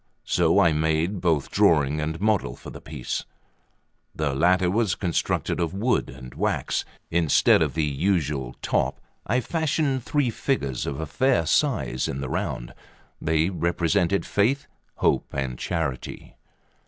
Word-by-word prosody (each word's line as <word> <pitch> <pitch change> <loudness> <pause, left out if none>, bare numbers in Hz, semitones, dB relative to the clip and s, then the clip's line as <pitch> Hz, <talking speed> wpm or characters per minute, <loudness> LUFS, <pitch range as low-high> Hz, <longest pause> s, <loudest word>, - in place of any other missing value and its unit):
So - - +3
I 85 - +5
made 80 +5 0
both 80 -6 +1
drawing 75 -1 +3
and 80 +1 -3
model 105 0 +1
for - - -10
the - - -10
piece. 75 -5 -4 0.9
The 75 -3 -1
latter 90 +6 +3
was 105 -3 +1
constructed 90 -1 -1
of 85 +1 -1
wood 120 +6 +1
and 65 -1 -10
wax. - - -1 0.3
Instead 80 -2 +4
of - - 0
the 80 - +1
usual 75 -4 -1
top, - - 0 0.3
I 120 +5 +2
fashioned 150 -2 0
three 135 0 0
figures 70 - -2
of 70 -1 -3
a 80 - -2
fair 125 - +1
size 75 - +1
in 70 - -4
the 65 -2 -4
round; - - -3 0.5
they 80 +3 +1
represented 85 +2 +1
Faith, 135 +8 +1 0.3
Hope, - - +1
and 65 -3 -3
Charity. 80 -7 -4
85 Hz, 140 wpm, -25 LUFS, 70-100 Hz, 0.9 s, I